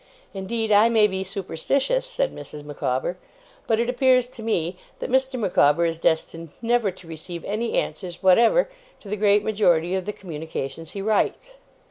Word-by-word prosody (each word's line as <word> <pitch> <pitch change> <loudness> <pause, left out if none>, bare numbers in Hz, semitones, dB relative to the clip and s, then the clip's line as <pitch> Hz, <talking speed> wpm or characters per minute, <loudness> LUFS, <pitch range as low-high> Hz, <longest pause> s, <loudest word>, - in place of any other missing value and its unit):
Indeed 215 +3 -2
I 210 +2 +6
may 220 -2 +5
be 190 -2 -1
superstitious,' 205 - -1
said - - -1
Mrs. 150 -1 -9
Micawber, 145 +2 -2 0.5
'but 225 -1 +2
it 235 - +1
appears 255 0 +3
to 230 - -10
me 180 -6 -1 0.2
that - - -5
Mr. 265 0 +1
Micawber 170 -5 +3
is 165 -1 -2
destined 165 0 -1
never 235 -2 +1
to 185 -2 -11
receive 165 +1 -8
any 220 +3 -2
answers 175 -2 -3
whatever 230 - +5 0.3
to - - -13
the 210 - -1
great 205 0 +3
majority 180 -6 +2
of 190 -1 -1
the 210 - -3
communications 160 -3 -6
he 195 - -5
writes. 220 - 0
200 Hz, 165 wpm, -24 LUFS, 170-230 Hz, 0.5 s, I